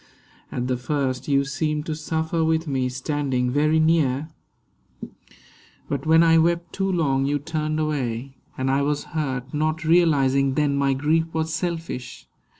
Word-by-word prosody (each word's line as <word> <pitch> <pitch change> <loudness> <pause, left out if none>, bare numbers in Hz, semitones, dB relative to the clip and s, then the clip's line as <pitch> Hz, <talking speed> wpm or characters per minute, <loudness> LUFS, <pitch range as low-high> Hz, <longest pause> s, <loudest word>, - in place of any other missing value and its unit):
At 125 - -2
the 130 -1 0
first 130 0 -2
you 140 -1 +2
seemed 150 +2 -2
To 160 - -2
suffer 160 +1 -1
with 160 0 +1
me, 130 -3 0
standing 130 -1 -1
very 155 +3 +2
near; 155 -3 +2 1.6
But 140 +1 -3
when 160 +1 +6
I 165 0 +5
wept 170 +1 0
too 195 0 -1
long, 140 -6 +1
you 145 +1 +1
turned 155 +1 -2
away. 135 -4 -2 0.2
And 130 0 0
I 135 +1 +2
was 145 +1 0
hurt, 135 -4 -3
not 155 +2 -1
realising 140 -5 +3
then 145 -1 +1
My 140 -1 +2
grief 160 +4 +1
was 160 0 -1
selfish. 165 -6 -4
150 Hz, 150 wpm, -23 LUFS, 135-160 Hz, 1.6 s, when